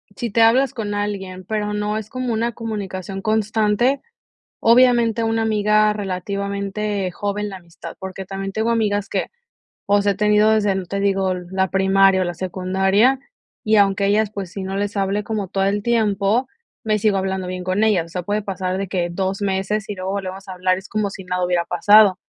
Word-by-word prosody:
si 235 -1 -4
te 230 - +2
hablas 255 +5 +4
con 210 -4 -4
alguien, 195 -3 -4
pero 210 0 -2
no 210 +1 -1
es 215 -1 -6
como 255 -1 -3
una 230 +1 -1
comunicación 195 -4 -5
constante, 220 +4 +1 0.6
obviamente 235 -1 +4
una 225 0 0
amiga 215 -1 +3
relativamente 200 +1 -3
joven 205 +2 -3
la 195 - -7
amistad, 170 -2 -11
porque 190 0 -7
también 195 +1 -5
tengo 220 +3 -1
amigas 205 -3 0
que, - - -2 0.6
o 205 0 +3
sea, 200 0 +2
he - - -3
tenido 210 +1 +4
desde, 210 -3 +2
no 190 -2 -4
te 200 - -3
digo, 195 -2 +1
la 190 +1 -2
primaria 195 0 +4
o - - 0
la 175 - -3
secundaria, 190 +7 +1 0.5
y 215 0 +3
aunque 200 0 +3
ellas, 210 +1 +2
pues, 195 -4 -5
si 195 - -6
no 190 +1 -4
les 205 +1 -2
hable 195 +1 0
como 210 -3 -3
todo 195 +1 -1
el 200 +1 0
tiempo, 220 +1 +1 0.4
me 215 -1 +1
sigo 205 -1 +2
hablando 190 -1 -2
bien 180 0 -5
con 185 +3 0
ellas. 200 -7 +2
O - - -16
sea, 180 +1 -4
puede 205 +3 -1
pasar 190 -1 -3
de 195 - -3
que 175 -2 -1
2 190 +2 -2
meses, 195 +2 -1
y 205 - -3
luego 185 0 -4
volvemos 195 0 -5
a 190 - -6
hablar, 185 0 0
es 195 - -14
como 210 -2 -1
si 190 - -9
nada 180 0 -1
hubiera 175 -1 +1
pasado. 200 +2 +5
200 Hz, 200 wpm, -21 LUFS, 190-215 Hz, 0.6 s, pasado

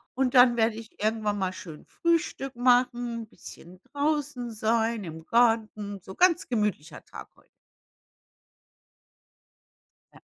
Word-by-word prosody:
Und 260 -1 0
dann 245 -2 +6
werde 225 -1 +2
ich 225 0 -12
irgendwann 215 -1 0
mal 190 -2 -2
schön 160 -5 -11
Frühstück 325 -6 -1
machen, 245 -2 +1
bisschen 180 -3 -14
draußen 285 -4 -2
sein 225 0 0
im 160 -2 -9
Garten, 220 -4 +1
so 190 +2 -11
ganz 355 -1 +3
gemütlicher 210 - -2
Tag - - -11
heut. - - -26 2.7
Ja. - - -17
230 Hz, 115 wpm, -27 LUFS, 210-250 Hz, 2.7 s, dann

